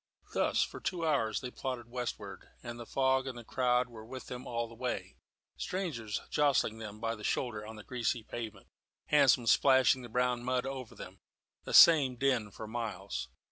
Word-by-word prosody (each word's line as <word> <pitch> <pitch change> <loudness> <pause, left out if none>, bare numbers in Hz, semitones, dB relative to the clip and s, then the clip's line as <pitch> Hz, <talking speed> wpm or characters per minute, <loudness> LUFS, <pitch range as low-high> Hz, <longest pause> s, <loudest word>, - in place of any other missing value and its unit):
Thus - - +2
for - - -6
two 175 -3 -2
hours 135 -8 +1
they 125 - -5
plodded 125 -3 -5
westward, 125 0 -6
and 120 0 -7
the 120 - -8
fog 130 0 +2
and 120 -3 -6
crowd 125 0 +1
were 115 -2 -11
with 130 +3 -8
them 125 0 -7
all 115 -1 -2
the 115 - -13
way 125 +2 -4 0.4
strangers 140 - -3
jostling 135 -6 +2
them 105 -1 -8
by 115 0 -1
the 105 -2 -9
shoulder 110 -1 -1
on 110 - -8
the 105 - -10
greasy 120 -1 -2
pavement, 110 -3 -7 0.4
hansoms 120 -1 +5
splashing 130 -1 +5
the 120 - -9
brown 125 +1 0
mud 125 0 0
over 130 -3 -6
them - - -10 0.5
the - - -5
same 145 -6 +8
din 125 -4 +1
for 110 - -8
miles. 110 -4 -4
120 Hz, 180 wpm, -32 LUFS, 115-130 Hz, 0.5 s, same